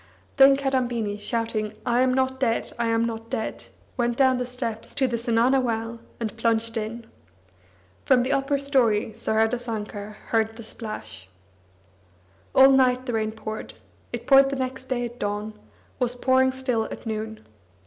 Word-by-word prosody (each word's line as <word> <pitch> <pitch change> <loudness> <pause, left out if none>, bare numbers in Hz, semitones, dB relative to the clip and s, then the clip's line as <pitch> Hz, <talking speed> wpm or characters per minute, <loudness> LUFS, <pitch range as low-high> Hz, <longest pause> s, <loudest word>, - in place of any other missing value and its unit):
Then 275 0 +8
Kadambini, 245 -6 -1
shouting 220 -1 -2
"I 240 +1 +2
am 255 0 +3
not 260 0 0
dead, 235 -4 0
I 235 - +1
am 230 0 +2
not 225 0 -5
dead," 220 - -4 0.3
went 240 -1 0
down 260 -2 +4
the 250 - -2
steps 235 -3 -5
to 270 - +2
the 240 - -1
zenana 235 +3 +2
well, 230 -1 -2 0.2
and 225 -1 -3
plunged 230 0 +1
in. 225 +1 -4 1.0
From 255 -2 +4
the 260 - -1
upper 275 +1 +1
storey 255 -7 +2
Saradasankar 220 -2 -2 0.2
heard 225 -1 +1
the 230 - -9
splash. 110 - -8 1.3
All 270 +1 +8
night 255 -1 +3
the 245 - -3
rain 220 -1 0
poured; 220 0 -7 0.4
it - - -5
poured 275 0 +5
next 260 0 -4
day 250 -2 -1
at 240 +1 -9
dawn, 205 +1 -3 0.5
was 245 -1 0
pouring 260 +1 +3
still 255 -4 -1
at - - -8
noon. 220 0 -5
235 Hz, 155 wpm, -25 LUFS, 220-260 Hz, 1.3 s, Then